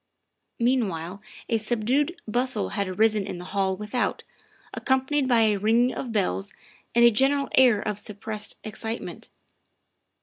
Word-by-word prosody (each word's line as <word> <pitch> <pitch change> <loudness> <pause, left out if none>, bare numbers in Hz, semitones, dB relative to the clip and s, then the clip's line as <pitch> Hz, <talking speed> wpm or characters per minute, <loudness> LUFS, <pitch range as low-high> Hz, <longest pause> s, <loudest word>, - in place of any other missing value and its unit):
Meanwhile 200 -7 -1 0.3
a 230 -2 +1
subdued 250 - 0
bustle 245 -1 0
had 200 -2 -2
arisen 210 +1 +2
in - - -5
the 175 - -8
hall 190 -1 0
without, 210 +4 -2 0.5
accompanied 265 +1 0
by 240 -3 +4
a 215 -2 +3
ringing 230 +5 +2
of 245 - -5
bells 200 -1 -1 0.4
and 235 0 +6
a 235 - +7
gen 265 +5 +4
eral 280 -1 -1
air 250 -5 +6
of 210 -1 -2
suppressed 210 +1 -4
excitement. 225 +1 -6
220 Hz, 140 wpm, -25 LUFS, 205-250 Hz, 0.5 s, a